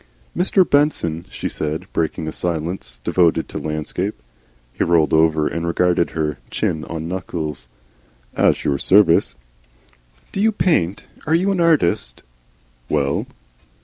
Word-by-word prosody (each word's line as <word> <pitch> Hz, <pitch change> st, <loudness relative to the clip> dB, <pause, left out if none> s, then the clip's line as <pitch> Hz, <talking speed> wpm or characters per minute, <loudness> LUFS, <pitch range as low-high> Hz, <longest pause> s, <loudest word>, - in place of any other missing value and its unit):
"Mr. 185 Hz, 0 st, +3 dB
Benson," 90 Hz, -, +1 dB
she -, -, -4 dB
said, 75 Hz, +1 st, -3 dB
breaking 80 Hz, 0 st, -2 dB
a -, -, -2 dB
silence 85 Hz, -7 st, -4 dB
devoted 85 Hz, -3 st, +2 dB
to -, -, -6 dB
landscape. 80 Hz, +6 st, -3 dB, 0.6 s
He -, -, -1 dB
rolled 85 Hz, -2 st, +2 dB
over 80 Hz, -1 st, +3 dB
and 85 Hz, 0 st, -3 dB
regarded 85 Hz, 0 st, +2 dB
her, 75 Hz, -3 st, -3 dB
chin 80 Hz, -1 st, -1 dB
on 80 Hz, -1 st, -5 dB
knuckles. 80 Hz, -8 st, -5 dB, 0.7 s
"At -, -, +2 dB
your 70 Hz, -1 st, +1 dB
service." 95 Hz, -2 st, +4 dB, 1.0 s
"Do 195 Hz, -, -2 dB
you 220 Hz, +1 st, +4 dB
paint? 160 Hz, -, +1 dB, 0.2 s
Are 160 Hz, -, +3 dB
you 190 Hz, +4 st, +2 dB
an 190 Hz, -, -1 dB
artist?" 140 Hz, -, +1 dB, 0.7 s
"Well." 70 Hz, -2 st, 0 dB
85 Hz, 130 wpm, -20 LUFS, 80-100 Hz, 1.0 s, service